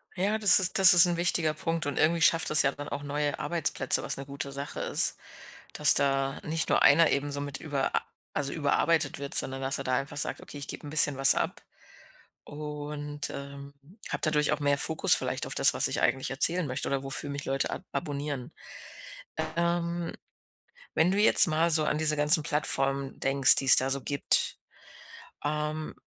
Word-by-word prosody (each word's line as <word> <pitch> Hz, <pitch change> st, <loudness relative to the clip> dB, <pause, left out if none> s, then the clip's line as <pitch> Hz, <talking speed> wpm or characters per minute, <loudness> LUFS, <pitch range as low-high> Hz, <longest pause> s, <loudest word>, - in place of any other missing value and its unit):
Ja, 200 Hz, +4 st, -2 dB
das 205 Hz, -3 st, +9 dB
ist 190 Hz, +1 st, +2 dB
das 190 Hz, -1 st, +9 dB
ist 175 Hz, +1 st, +7 dB
'n 175 Hz, -1 st, -3 dB
wichtiger 170 Hz, -2 st, 0 dB
Punkt 165 Hz, +1 st, -5 dB
und 145 Hz, -2 st, -5 dB
irgendwie 165 Hz, +2 st, +1 dB
schafft 165 Hz, +2 st, +2 dB
das 155 Hz, -, +5 dB
ja 140 Hz, -, 0 dB
dann 145 Hz, +1 st, -10 dB
auch 140 Hz, 0 st, -7 dB
neue 145 Hz, 0 st, -4 dB
Arbeitsplätze, 160 Hz, -5 st, 0 dB
was -, -, -3 dB
'ne 135 Hz, -, -9 dB
gute 140 Hz, 0 st, -8 dB
Sache 140 Hz, +1 st, -8 dB
ist. -, -, 0 dB, 0.6 s
Dass -, -, +6 dB
da 135 Hz, 0 st, -1 dB
nicht 160 Hz, +1 st, -4 dB
nur -, -, 0 dB
einer 160 Hz, +2 st, +4 dB
eben 145 Hz, +1 st, -3 dB
so 145 Hz, 0 st, -5 dB
mit 145 Hz, -1 st, -7 dB
über 145 Hz, -4 st, -4 dB, 0.4 s
also, 140 Hz, -1 st, -4 dB
überarbeitet 155 Hz, 0 st, -1 dB
wird, 140 Hz, 0 st, -8 dB
sondern 135 Hz, 0 st, 0 dB
dass 135 Hz, +1 st, -1 dB
er -, -, -6 dB
da 130 Hz, -1 st, -2 dB
einfach 140 Hz, +2 st, -6 dB
sagt: -, -, -3 dB
„Okay, -, -, -12 dB
ich 140 Hz, -, -8 dB
gebe -, -, -9 dB
'n -, -, -9 dB
bisschen 150 Hz, -2 st, +3 dB
was 135 Hz, 0 st, +4 dB
ab -, -, -5 dB, 0.8 s
und, 145 Hz, 0 st, -7 dB
ähm, 140 Hz, 0 st, -11 dB, 0.3 s
habe -, -, -6 dB
dadurch 150 Hz, -2 st, 0 dB
auch 150 Hz, -, -2 dB
mehr 145 Hz, -1 st, 0 dB
Fokus 160 Hz, +2 st, +3 dB
vielleicht -, -, -3 dB
auf -, -, -5 dB
das, -, -, +5 dB
was -, -, +2 dB
ich -, -, -4 dB
eigentlich 130 Hz, -, -2 dB
erzählen 165 Hz, +5 st, +1 dB
möchte 130 Hz, -1 st, -4 dB
oder 135 Hz, -1 st, -3 dB
wofür 135 Hz, +1 st, -1 dB
mich 140 Hz, 0 st, -7 dB
Leute 135 Hz, 0 st, -3 dB
ab -, -, -8 dB
abonnieren.“, 145 Hz, -4 st, -6 dB, 1.1 s
ähm, 170 Hz, 0 st, -3 dB, 0.8 s
wenn 165 Hz, +3 st, +1 dB
du 200 Hz, -, -2 dB
jetzt 215 Hz, -, +7 dB
mal 160 Hz, +1 st, -1 dB
so 155 Hz, -2 st, +2 dB
an 150 Hz, -, -3 dB
diese 155 Hz, -1 st, +1 dB
ganzen 150 Hz, +3 st, +4 dB
Plattformen 135 Hz, -2 st, -2 dB
denkst, 135 Hz, 0 st, +5 dB
die -, -, +1 dB
es 135 Hz, -, +8 dB
da 130 Hz, -, +2 dB
so 140 Hz, 0 st, -2 dB
gibt, 140 Hz, +2 st, 0 dB, 0.9 s
ähm 150 Hz, +1 st, -5 dB
145 Hz, 195 wpm, -26 LUFS, 140-160 Hz, 1.1 s, das